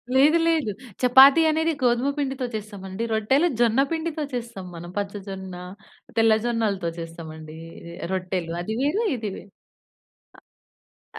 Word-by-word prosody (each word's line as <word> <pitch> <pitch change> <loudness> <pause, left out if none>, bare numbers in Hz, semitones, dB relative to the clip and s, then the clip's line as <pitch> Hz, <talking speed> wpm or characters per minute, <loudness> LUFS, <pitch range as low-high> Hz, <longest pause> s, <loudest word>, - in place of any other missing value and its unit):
లేదు, 300 +5 +6
లేదు. 315 -10 +1 0.3
చపాతీ 265 +5 +8
అనేది 320 +1 +1
గోధుమ 245 +3 +2
పిండితో 270 -2 -2
చేస్తామండి. 200 0 -6
రొట్టెలు 265 +10 +3
జొన్న 235 +1 +3
పిండితో 320 -1 -2
చేస్తాం 235 -6 -5
మనం. 170 +1 -8
పచ్చ 200 -1 -2
జొన్న, 190 -1 -6 0.6
తెల్ల 225 -1 +5
జొన్నలతో 215 -7 0
చేస్తామండి. 160 -1 -8 0.2
ఇది 170 0 -10 0.2
రొట్టెలు 180 -2 -2
అది 220 +5 -3
వేరు, 300 +10 +1
ఇది 220 -3 -4
వేరు. 195 - -12 1.7
అ - - -6
220 Hz, 130 wpm, -24 LUFS, 190-270 Hz, 1.7 s, చపాతీ